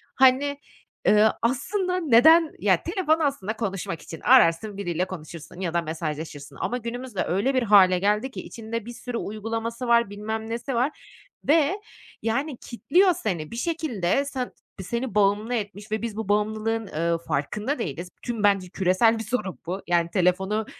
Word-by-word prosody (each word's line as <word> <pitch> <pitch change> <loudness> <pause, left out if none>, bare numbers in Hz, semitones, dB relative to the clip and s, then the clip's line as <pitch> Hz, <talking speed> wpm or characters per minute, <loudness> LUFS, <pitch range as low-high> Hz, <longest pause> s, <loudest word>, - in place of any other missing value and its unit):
hani, 265 +2 +4 0.5
eee, 210 +1 +6
aslında 360 - 0
neden 315 +3 +6
ya, - - +2
telefon 330 -5 +1
aslında 275 -9 -1
konuşmak 190 -7 -3
için. 165 - -9
Ararsın 210 -4 +4
biriyle 175 -2 -1
konuşursun 170 -1 -9
ya 175 -3 -2
da 170 - +2
mesajlaşırsın 155 -3 -5
ama 245 - -1
günümüzde 240 -2 -4
öyle 200 +10 0
bir 255 - +2
hâle 190 -4 +6
geldi 210 +7 +1
ki - - -6
içinde 230 -1 -6
bir 240 - -7
sürü 240 0 -5
uygulaması 225 +3 -4
var, 235 -3 +4
bilmem 220 +2 -5
nesi 235 +3 -3
var 255 +6 +2 0.6
ve, 325 +6 +3 0.4
yani, 255 +4 -1
kitliyor 355 +10 +2
seni. 175 - -3
Bir - - -6
şekilde 280 - 0
sen 260 -3 -4 0.3
seni 235 +2 -3
bağımlı 210 +3 +2
etmiş 205 0 -5
ve 220 - -1
biz 225 -2 -4
bu 220 -3 -4
bağımlılığın, 215 +1 0
eee, 170 +1 0
farkında 210 - -2
değiliz. 175 -1 -4
Tüm 230 -4 -4
bence 195 -3 +3
küresel 195 +5 +2
bir - - -3
sorun 220 -4 -3
bu. 185 +3 -4
Yani 170 -1 +2
telefonu, 190 +4 +1
220 Hz, 160 wpm, -25 LUFS, 185-250 Hz, 0.6 s, eee